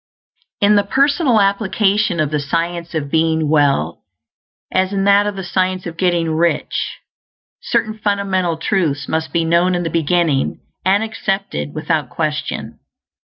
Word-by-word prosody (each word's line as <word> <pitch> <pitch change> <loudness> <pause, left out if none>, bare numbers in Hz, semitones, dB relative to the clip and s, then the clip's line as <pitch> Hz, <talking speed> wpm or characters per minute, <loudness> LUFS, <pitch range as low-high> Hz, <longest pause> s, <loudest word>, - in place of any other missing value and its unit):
In 205 +1 +5
the 205 - +3
personal 275 - +2
application 200 -1 +1
of 155 -2 0
the 150 - 0
Science 170 +3 -3
of 145 -3 -3
Being 160 -1 +2
Well, 145 -3 +2 0.7
as 185 +1 +1
in 195 -1 0
that 200 +1 +4
of 205 - -3
the 190 - -5
Science 185 0 -1
of 170 -1 -6
Getting 170 -2 +1
Rich, 165 +2 -1 0.6
certain 215 -1 -1
fundamental 195 -5 0
truths 160 -5 -1
must 160 0 -2
be 165 -1 +1
known 170 +2 +2
in 175 - -1
the 165 - -3
beginning, 165 -3 +1 0.2
and 195 +3 +3
accepted 195 -7 -3
without 155 -3 -1
question. 155 0 -3
175 Hz, 145 wpm, -18 LUFS, 160-200 Hz, 0.7 s, In